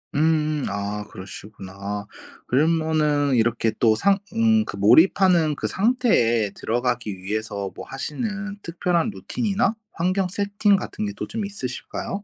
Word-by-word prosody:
음음 155 -1 +1
아 100 +1 -3
그러시구나. 95 0 -10
아 100 0 -4 0.4
그러면은 150 -1 +2
이렇게 115 -1 +2
또 110 -2 +5
상 195 - +3 0.2
음 225 -1 +3
그 - - -6
몰입하는 160 - +5
그 - - -3
상태에 190 - +2
들어가기 120 -4 -2
위해서 100 0 -3
뭐 - - -8
하시는 200 - -4
특별한 175 +3 0
루틴이나 215 0 -1 0.2
환경 185 +3 0
세팅 200 +1 +1
같은 210 +2 -4
게 205 - -4
또 - - -5
좀 220 -2 -3
있으실까요? 195 +3 -5
155 Hz, 295 characters per minute, -23 LUFS, -, 0.4 s, 또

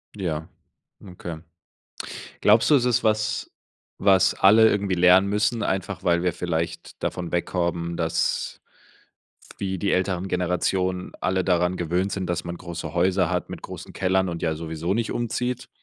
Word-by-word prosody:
Ja, 80 -6 -3 0.6
okay. 90 -3 -7 1.0
Glaubst 110 +8 +5
du, - - +8
es 125 -3 +3
ist 120 -2 +2
was, 110 0 0 0.5
was 95 -2 +4
alle 110 +3 +6
irgendwie 100 -2 0
lernen 90 +2 +6
müssen, 105 +3 +1
einfach 95 -1 -2
weil 85 0 +2
wir 90 -1 +1
vielleicht 85 -1 -4
davon 90 -2 -3
weg 85 - 0
kommen, 85 -1 -2
dass, 80 -1 -1 1.0
wie 95 -1 -2
die 100 - 0
älteren 95 0 0
Generationen 90 0 -1
alle 95 0 +1
daran 90 0 +2
gewöhnt 90 +3 -1
sind, 95 -2 -3
dass 85 - -1
man 85 0 -5
große 85 -1 -6
Häuser 90 0 +2
hat 90 -3 -2
mit - - -7
großen - - -9
Kellern 95 0 +1
und 85 -1 -5
ja 80 -1 0
sowieso 80 +3 -3
nicht 115 0 -1
umzieht, 125 +1 -2
90 Hz, 155 wpm, -24 LUFS, 85-100 Hz, 1.0 s, du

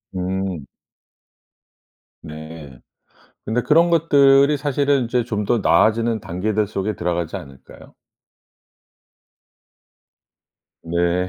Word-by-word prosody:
음. 95 -3 -3 1.6
네. 80 -4 -10 0.7
근데 115 +3 -1
그런 165 +3 +3
것들이 145 -3 +4
사실은 140 -2 0
이제 120 +1 0
좀 105 -3 -3
더 120 - +1
나아지는 110 +2 +2
단계들 105 +3 -2
속에 100 +1 -3
들어가지 85 +1 -3
않을까요? 70 -7 -14 2.9
네. 85 +2 -1
105 Hz, 180 characters per minute, -20 LUFS, 85-130 Hz, 2.9 s, 것들이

